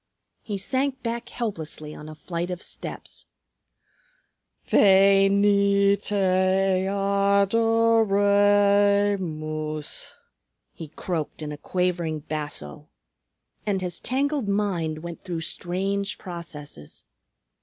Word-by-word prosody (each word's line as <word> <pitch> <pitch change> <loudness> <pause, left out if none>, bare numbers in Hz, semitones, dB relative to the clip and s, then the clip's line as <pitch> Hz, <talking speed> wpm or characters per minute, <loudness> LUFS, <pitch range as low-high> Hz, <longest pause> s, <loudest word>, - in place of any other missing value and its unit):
He 205 -2 -4
sank 260 +6 -2
back 235 0 -4
helplessly 160 -9 -5
on 150 0 -10
a 155 - -9
flight 170 +3 -4
of 180 -1 -4
steps. - - -8 1.4
"Ve 195 0 +5
ni 200 0 +4
te 205 +1 -4 0.7
a 200 0 +2
do 230 +1 +3
re 205 0 +4
mus!" 155 -3 -4 0.6
he 160 - -8
croaked 160 0 -4
in 150 - -5
a 150 - -6
quavering 175 -4 -1
basso. 145 - -6 0.8
And 195 -2 0
his 180 -2 -4
tangled 275 -1 -1
mind 175 -6 -1
went 170 -1 -8
through 175 -4 -4
strange 195 +4 -3
processes. 150 - -10
195 Hz, 100 wpm, -25 LUFS, 165-205 Hz, 1.4 s, Ve